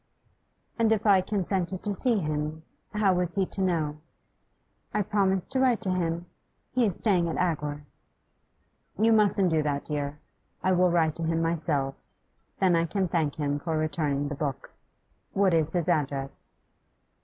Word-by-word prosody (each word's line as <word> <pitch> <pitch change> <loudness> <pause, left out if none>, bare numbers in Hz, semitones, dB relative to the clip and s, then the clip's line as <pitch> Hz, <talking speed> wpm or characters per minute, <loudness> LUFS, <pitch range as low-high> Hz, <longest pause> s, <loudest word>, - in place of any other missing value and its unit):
'And 225 -1 +3
if 220 -1 +1
I 195 -3 +6
consented 185 -2 -2
to 205 - +1
see 235 +4 +1
him, 155 -2 -3 0.3
how 210 -3 +2
was 180 -1 -1
he 195 -1 +2
to 195 - -4
know?' 160 -5 0 1.0
'I 210 - +2
promised 190 -2 0
to 265 - +1
write 255 -3 +3
to 195 -4 0
him. 170 -1 -1 0.5
He 250 -3 +2
is 190 - -1
staying 180 -6 +2
at - - -3
Agworth.' 150 -4 -1 1.1
'You 225 +3 +4
mustn't 200 -4 +4
do 160 -1 +2
that, 145 -1 -1
dear. 145 -1 -2 0.5
I 185 - +2
will 180 0 +4
write 165 -3 +2
to 165 - -4
him 165 0 0
myself, 150 -5 -1 0.6
then 185 -3 +4
I 165 0 +2
can 190 +1 -1
thank 160 -4 0
him 145 -2 -1
for 160 +1 -2
returning 145 -2 -1
the 145 - -4
book. 140 -2 -4 0.6
What 195 -2 +3
is 160 -1 +2
his 175 -2 0
address? 140 -5 -2
170 Hz, 165 wpm, -27 LUFS, 150-195 Hz, 1.1 s, I